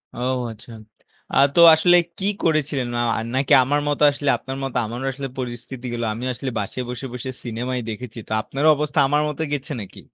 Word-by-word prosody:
ও! - - -7 0.3
আচ্ছা। 110 +2 -13 0.6
আ - - 0 0.2
তো - - +4 0.2
আসলে 175 +3 +4 0.2
কি 190 - -4 0.2
করেছিলেন? 150 -5 +1
না - - 0 0.4
নাকি 135 0 +2
আমার 145 +3 +1
মতো, 145 0 +1
আসলে 145 0 -2
আপনার 130 +1 -7
মতো 135 -2 -3
আমারও 120 +4 -5
আসলে 135 0 -5
পরিস্থিতি 125 0 -6
গুলো। 120 0 -2
আমিও 125 +4 -4
আসলে 130 +2 -5
বাসায় 105 +5 -4
বসে, 125 +2 -5
বসে 125 +1 -5
সিনেমায় 125 +2 -3
দেখেছি। 115 +1 -7
তো - - -14
আপনার 135 +6 -3
অবস্থা, 150 0 -1
আমার 145 +2 +2
মতো 150 +1 -5
গেছে 145 +2 -4
নাকি? 95 - -11
130 Hz, 190 wpm, -22 LUFS, 120-145 Hz, 0.6 s, তো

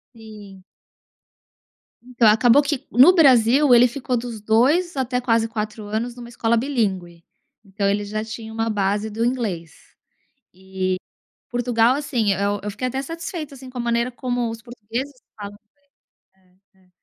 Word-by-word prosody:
Sim. 210 -4 -13 1.5
Então 240 -2 +3
acabou 235 +6 +5
que 280 -1 -3
no 265 +9 +7
Brasil 265 -3 +5
ele 245 +1 +7
ficou 250 0 -3
dos 230 -2 -6
2 270 - +2
até 250 -1 -1
quase 230 -2 +1
4 215 -1 -5
anos 225 +3 -3
numa 240 -1 -10
escola 235 -1 0
bilíngue, 195 - -2 0.4
então 200 0 -3
ele 205 +1 0
já 215 +1 -4
tinha 220 0 -8
uma 225 0 -1
base 205 +1 -1
do 220 +2 -3
inglês. 205 -10 -3 0.8
E 190 0 -3 0.5
Portugal, 245 0 +2
assim, 245 -8 0
eu 200 +2 -1
eu 210 - -3
fiquei 255 +5 -4
até 265 +2 -3
satisfeita 330 -1 -7
assim 260 0 -11
com 255 - -11
a 245 - -1
maneira 235 +1 0
como 245 -2 -2
os 225 0 -7
portugueses 240 +3 -6 0.2
falam 205 0 -9 0.8
inglês 185 -1 -32 0.2
É 190 - -30
é. - - -31
230 Hz, 155 wpm, -21 LUFS, 205-250 Hz, 1.5 s, no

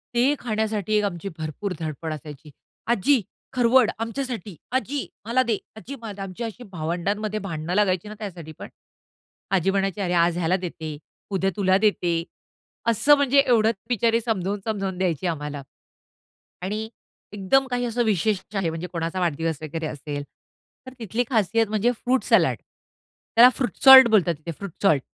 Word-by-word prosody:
ते 255 +4 +4
खाण्यासाठी 215 -2 -2
एक 210 - +2
आमची 195 0 -4
भरपूर 160 +5 -4
धडपड 160 0 -4
असायची. 150 0 -10 0.4
"आजी 240 +3 +3 0.3
खरवड 250 -1 +4
आमच्यासाठी. 230 -4 -4 0.2
आजी, 265 +2 -2 0.2
मला 245 +3 +2
दे 230 -4 0 0.2
आजी 255 +5 -8
मला" 205 -3 -7
आमची 195 +4 -6
अशी 230 +2 -6
भावंडांमध्ये 195 +6 -2
भांडण 165 -5 -6
लागायची 190 -2 +1
ना 210 - -7
त्यासाठी 175 -7 -7
पण. - - -8 0.8
आजी 195 0 +2
म्हणायची, 195 0 -1
"अरे! 180 -2 -1
आज 170 0 +3
ह्याला 175 +1 +1
देते, 160 -4 -6 0.3
उद्या 195 0 +1
तुला 190 -2 +3
देते." 175 -5 +1 0.7
असं 280 +6 +5
म्हणजे 280 -1 +3
एवढंच 230 -2 +3
बिचारी 230 0 +2
समजावून-समजावून 195 -2 -2
द्यायची 180 -2 -1
आम्हाला 150 -3 -4 1.0
आणि 210 +4 -3 0.4
एकदम 210 +7 +2
काही 245 0 0
असं 240 +1 0
विशेष 210 -2 +1
आहे, 190 -4 0
म्हणजे 165 +2 -5
कोणाचा 165 +2 -2
वाढदिवस 165 -2 -1
वगैरे 160 +1 -4
असेल, 145 -1 -5 0.6
तर 260 - -8
तिथली 225 +2 -1
खासियत 225 -1 +2
म्हणजे 215 +3 +2
फ्रूट 250 +2 0
सलाड - - +3 0.8
त्याला 240 +2 +9
फ्रूट 255 - -2
सॉल्ट 265 -2 +11
बोलतात 185 -6 +3
तिथे 160 +3 -7
फ्रूट 195 +4 -8
सॉल्ट. 150 -9 +4
200 Hz, 150 wpm, -24 LUFS, 170-230 Hz, 1.0 s, सॉल्ट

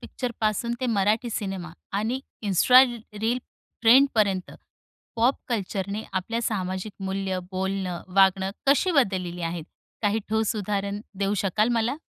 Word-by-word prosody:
पिक्चरपासून 235 -1 -2
ते 255 - 0
मराठी 220 +1 +1
सिनेमा 190 -5 -4 0.3
आणि 230 +5 -1 0.3
इंस्ट्रा 250 +7 +7
reel 230 -1 -3 0.4
ट्रेंडपर्यंत 225 -6 +4 0.7
pop 240 +4 +3
कल्चरने 200 -2 -2
आपल्या 195 +5 -2
सामाजिक 190 -2 -2
मूल्य, 190 -1 -2
बोलणं, 190 -1 -2
वागणं 190 0 +4 0.2
कशी 285 +7 +4
बदललेली 185 - +1
आहेत? 165 -1 -3 0.4
काही 205 +1 +2
ठोस 220 0 +1
उदाहरण 200 0 -2 0.2
देऊ 200 +1 +1
शकाल 210 +3 +2
मला? 235 +3 +1
205 Hz, 120 wpm, -25 LUFS, 190-230 Hz, 0.7 s, इंस्ट्रा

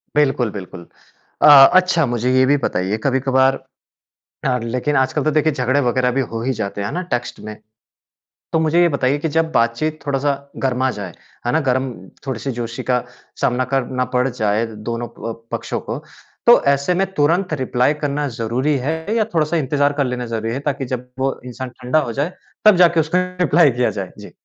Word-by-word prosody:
बिल्कुल, 135 -6 +2
बिल्कुल। 90 -3 -9 0.5
अ, - - +7 0.3
अच्छा, 180 -3 +1
मुझे 120 0 -1
ये 130 0 +5
भी 145 +2 +3
बताइए, 95 +4 -1
कभी-कभार 135 0 +2 0.8
आग 125 -2 0
लेकिन 125 +5 -1
आजकल 130 +2 +1
तो 155 - +1
देखिए 155 +1 +2
झगड़े 130 +1 +1
वगैरह 125 0 +1
भी 135 - +3
हो 115 - -3
ही 130 - 0
जाते 100 -3 -4
हैं, 100 - -2
है - - -5
ना, 180 - -2
टेक्स्ट 125 0 -3
में। 110 0 -8 1.0
तो 160 - +3
मुझे 160 +2 +3
ये 175 - +4
बताइए 140 -1 +1
कि 160 - -2
जब 160 +1 0
बातचीत 150 +6 0
थोड़ा-सा 140 0 0 0.3
गरमा 130 0 +1
जाए, 100 -6 -6 0.4
है - - +2
ना? 160 - +2
गर्म 130 +1 0 0.4
थोड़ी-सी 135 +1 -3
जोशी 115 0 -4
का 125 -1 +2 0.4
सामना 125 +1 +1
करना 130 -1 0
पड़ 125 +1 +3
जाए 110 -1 0 0.2
दोनों 120 0 -3 0.2
अ, - - -5 0.2
पक्षों - - -3
को, - - -2 0.5
तो - - +8
ऐसे 140 +6 0
में - - +3
तुरंत 170 +3 +1
रिप्लाई 125 +3 +2
करना 145 +1 -1
ज़रूरी 130 +6 0
है 160 +2 0 0.2
या 220 -2 +2
थोड़ा-सा 160 +1 +1
इंतज़ार 145 0 +1
कर 140 -1 0
लेना 125 -1 -3
ज़रूरी 115 -1 -3
है, 135 - -2
ताकि 140 -2 -2
जब 125 +1 -11
वो 135 0 -1
इंसान 125 +1 -6
ठंडा 125 +5 +2
हो - - -4
जाए, 170 +6 -1 0.3
तब 215 -2 +8
जाके 170 -1 +4
उसको 160 +3 +1 0.3
रिप्लाई 150 -2 +5
किया 125 0 +1
जाए। 95 - -5
जी। - - -11
130 Hz, 190 wpm, -19 LUFS, 120-150 Hz, 1.0 s, तो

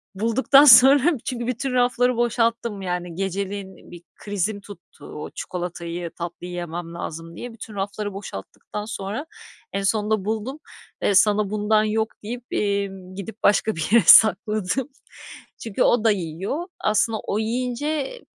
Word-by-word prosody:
bulduktan 235 +7 +4
sonra 275 +5 +7
çünkü 240 -2 -3
bütün 250 +2 -2
rafları 245 0 +2
boşalttım, 230 -3 0
yani, 180 -2 -4
geceleyin 195 +1 -5
bir 175 -1 -11
krizim 205 0 -3
tuttu. 200 -4 -14
"O 150 - -8
çikolatayı 175 -1 -5
tatlıyı 175 +1 -7
yemem 175 -1 -6
lazım." 165 0 -7
diye. 245 +4 -8
Bütün 220 -1 -10
rafları 205 +1 -4
boşalttıktan 195 - -8
sonra 215 +5 -5 0.5
en 200 - -2
sonunda 210 0 0
buldum. 220 +7 -3 0.4
"Eee, 200 - +2
sana 210 +1 +4
bundan 215 +1 +2
yok." 220 +1 0 0.2
deyip, 240 +3 -6
emm, 195 -2 -2
gidip 200 +3 -9
başka 210 +2 +3
bir 160 -1 -2
yere 235 0 +6
sakladım. 215 +4 +5 0.7
Çünkü 225 +2 -1
o 240 -2 +3
da 225 - +5
yiyor. 195 - -3
Aslında 215 +1 +1
o 205 - -3
yiyince 255 - -2
210 Hz, 135 wpm, -23 LUFS, 190-235 Hz, 0.7 s, sonra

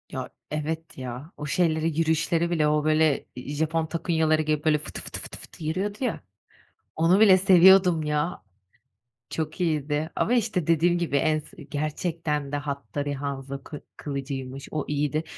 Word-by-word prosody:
Ya, - - -5 0.2
evet 160 +1 -4
ya, 130 +4 -7
o 150 - -5
şeyleri, 160 0 +1
yürüyüşleri 165 +1 +1
bile, 160 -3 +2
o 150 0 +2
böyle, 155 -1 +2
iii, 130 +4 -6
Japon 160 +2 0
takunyaları 160 -1 +1
giyip 155 0 -1
böyle 155 -1 +4
fıtı, 150 - -6
fıtı, - - -6
fıtı, - - -8
fıtı - - -11
yürüyordu 190 +7 -2
ya, 245 - -1 0.7
onu 170 +4 +4
bile 200 -4 +8
seviyordum 185 -2 +6
ya. 150 +3 -1 0.9
Çok 155 +2 -4
iyiydi. 155 -2 0
Ama 235 - +1
işte 215 -8 0
dediğim 170 +2 +3
gibi, 170 -5 0
en 155 +2 +2
s 155 +1 -12
gerçekten 150 0 -2
de - - 0
Hattori 145 0 -3
Hanzo 140 -1 -5
kı 145 +1 -8 0.2
kılıcıymış, 135 -1 -5
o 155 -2 -2
iyiydi. 150 +1 0
155 Hz, 155 wpm, -26 LUFS, 145-165 Hz, 0.9 s, bile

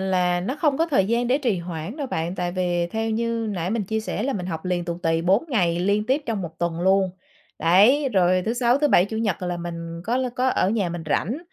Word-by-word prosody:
là 180 -2 +1
nó 255 +11 -3
không 295 -2 +1
có 330 - +2
thời 270 - +2
gian 235 +2 +1
để 255 +3 +2
trì 240 -10 0
hoãn 170 - -6
đâu 285 -3 -3
bạn, 170 -4 -3
tại 175 -1 -2
vì 175 -1 0
theo 225 +2 -2
như 230 0 -1
nãy 180 -2 -3
mình 225 0 0
chia 220 +3 -2
sẻ 215 - -3
là 275 +3 -1
mình 180 -7 -4
học 160 -2 -5
liền 180 -1 -1
tù 170 0 -4
tì 165 0 +1
4 190 - +3
ngày 175 - +1
liên 200 +3 +1
tiếp 275 +4 +1
trong 220 -5 -2
1 160 -2 -8
tuần 170 -1 -2
luôn, 190 +1 +3 0.5
đấy, 210 - +4
rồi 185 -1 +3
thứ 225 - +1
Sáu, 245 +2 +2
thứ 295 - +2
Bảy, 180 - +5
Chủ 220 +3 -5
nhật 210 -5 -1
là 180 -1 -2
mình 170 -1 -6
có 235 +4 0
l 260 0 0
có 255 +1 +2
ở 195 -6 +1
nhà 205 -5 0
mình 170 0 -5
rảnh. 215 - 0
190 Hz, 260 wpm, -23 LUFS, 175-235 Hz, 0.5 s, Bảy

